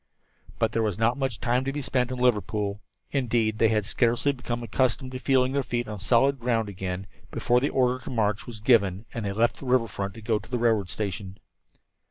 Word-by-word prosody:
But - - +1
there 115 - 0
was 105 -4 -1
not 115 +2 +2
much 135 -5 -2
time 125 +2 +1
to 135 - -1
be 145 - -4
spent 125 -2 0
in 130 - -4
Liverpool. 105 -4 0 0.3
Indeed, 115 -5 +1
they 115 - +5
had 105 -2 +1
scarcely 120 +6 +2
become 120 -3 -4
accustomed 130 +2 0
to 130 - -5
feeling 130 -1 +2
their 140 +1 +1
feet 120 -2 -2
on 105 -1 -6
solid 130 +6 +3
ground 115 -3 0
again 95 0 -4 0.2
before 120 0 +2
the 140 - 0
order 125 -1 +1
to - - -7
march 105 -4 0
was 115 -3 -7
given, 105 -4 +3
and 115 - -4
they 100 - -1
left 115 +4 +1
the 135 - -9
river 125 -2 +3
front 100 -1 -5
to 115 - -10
go 110 -1 +1
to - - -15
the 125 - -1
railroad 110 -5 +2
station. 100 -1 -4
115 Hz, 220 wpm, -26 LUFS, 105-125 Hz, 0.3 s, they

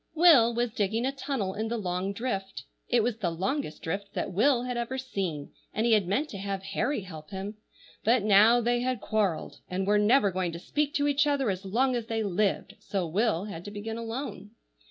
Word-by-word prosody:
WILL 290 -9 +6
was 240 0 0
digging 220 +2 0
a 265 - +1
tunnel 270 -8 -3
in 220 +3 -2
the 235 +1 -2
long 185 -1 -2
drift. 195 - -4 0.2
It 240 -2 +3
was 235 -1 -1
the 195 -6 -1
longest 185 - -3
drift 200 +4 -4
that - - -2
Will 245 +5 +3
had 250 0 -3
ever 240 +2 -2
seen, 190 - -4 0.2
and 220 - +1
he 235 - +3
had 210 -5 +4
meant 265 +11 0
to 200 - -7
have 195 -1 -3
Harry 215 +6 -1
help 160 -5 -10
him, 200 +2 -6 0.5
but 230 0 +3
now 215 +4 +6
they 240 +1 +1
had 250 -1 -1
quarrelled, 200 -6 -1
and 185 +1 -1
were 205 +1 +3
never 210 -1 +4
going 180 -2 -2
to 170 - -6
speak 295 - -1
to 285 -1 +2
each 290 +1 +3
other 275 -6 +1
as 190 +1 -5
long 250 +6 +1
as 235 -2 -3
they 225 -1 -1
lived, 200 0 -1
so 195 -3 -2
Will 190 +2 +1
had 175 -5 -7
to - - -5
begin 215 +2 -5
alone. 230 -3 -5
215 Hz, 215 wpm, -28 LUFS, 195-245 Hz, 0.5 s, WILL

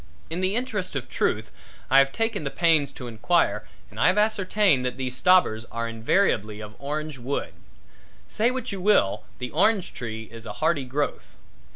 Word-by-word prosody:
In 170 +3 -2
the 190 +2 +1
interest 225 -9 -2
of 135 - -3
truth - - -1 0.4
I 135 - +8
have 135 0 +4
taken 225 -3 -1
the 140 - -1
pains 160 -3 +2
to 125 - -8
enquire 110 -1 +1 0.2
and 105 - -10
I - - +4
have 185 +3 +3
ascertained 205 -8 +2
that 125 0 -3
these 130 -1 -3
stobbers 180 -11 +4
are 115 0 -3
invariably 110 - +1
of 105 -1 -8
orange 150 0 -4
wood. 130 +4 -3 0.7
Say 225 +3 +1
what 255 -2 -4
you 195 -2 -5
will, 195 - +2
the 125 -1 -5
orange 190 +4 +2
tree 110 -2 -5
is 115 0 -10
a - - -5
hardy 155 -4 0
growth. 140 +3 -3
145 Hz, 180 wpm, -25 LUFS, 120-190 Hz, 0.7 s, I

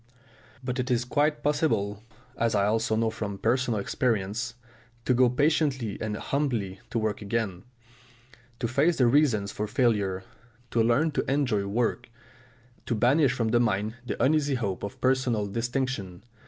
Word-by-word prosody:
But 125 0 -3
it 125 +1 -1
is 120 -1 +1
quite 150 +3 +1
possible, 140 -9 0 0.3
as 115 -2 0
I 100 -1 +3
also 110 +1 +1
know 110 0 +1
from 105 -2 -4
personal 120 +1 +1
experience, 115 +1 -1 0.5
to 125 - +3
go 125 0 +4
patiently 135 -4 +1
and 105 -1 -2
humbly 115 -11 -2
to - - -2
work 110 -2 -1
again, 100 -3 -2 0.9
to 120 - -1
face 145 +8 +2
the 125 - +4
reasons 120 -6 +3
for 105 - -3
failure, 100 -5 +1 0.5
to 115 - +2
learn 120 +8 +3
to 135 - -1
enjoy 125 -8 +1
work, 120 +3 -1 0.8
to 120 - 0
banish 130 +4 +3
from 115 -4 -1
the 120 +2 +3
mind 110 -2 0
the 125 - -4
uneasy 145 0 +2
hope 100 -7 -2
of 100 - -6
personal 130 -5 +1
distinction. 115 -3 -3
120 Hz, 155 wpm, -27 LUFS, 105-130 Hz, 0.9 s, go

